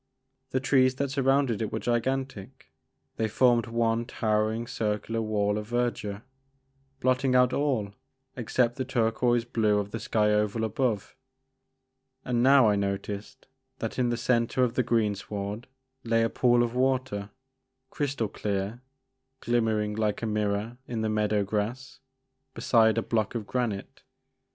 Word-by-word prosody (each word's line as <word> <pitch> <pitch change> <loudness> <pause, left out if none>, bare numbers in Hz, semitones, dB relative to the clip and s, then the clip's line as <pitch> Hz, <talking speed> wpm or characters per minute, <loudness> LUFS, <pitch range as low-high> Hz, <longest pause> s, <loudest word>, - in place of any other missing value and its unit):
The 130 - 0
trees 130 -1 +3
that 140 0 -2
surrounded 135 -4 +2
it 110 - -2
were - - -2
gigan 130 +3 0
tic; 100 -8 -13 0.5
they 110 - +1
formed 120 +1 +3
one 115 0 0
towering 110 -1 0
circular 110 0 -2
wall 105 -1 0
of 105 - -7
verdure, 120 -4 -2 0.8
blotting 130 0 +2
out 125 0 +4
all 125 -9 0 0.4
except 120 0 0
the 130 - -1
turquoise 120 -1 +1
blue 110 -3 +1
of 100 0 -2
the 115 - -4
sky 110 -2 +1
oval 105 +1 +1
above. 110 -1 -1 1.1
And 120 -1 0
now 135 -1 +6
I 105 - +3
noticed 100 +4 -4 0.3
that 115 +1 -4
in 125 -1 +2
the 120 - -1
centre 120 +1 +1
of 120 -2 +1
the - - +2
greensward 105 -1 -2 0.4
lay 115 0 +2
a 115 - 0
pool 120 -1 +3
of 120 -1 -2
water, 130 -5 0 0.6
crystal 140 -6 -1
clear, 100 +3 -3 0.6
glimmering 110 -3 0
like 105 0 -1
a - - +1
mirror 105 +2 -1
in 115 -2 -3
the 110 - 0
meadow 105 -1 +1
grass, 110 +6 -3 0.6
beside 110 -2 +3
a 115 - +1
block 110 -1 -1
of 110 -3 -3
granite. 110 -4 -3
115 Hz, 145 wpm, -27 LUFS, 105-125 Hz, 1.1 s, now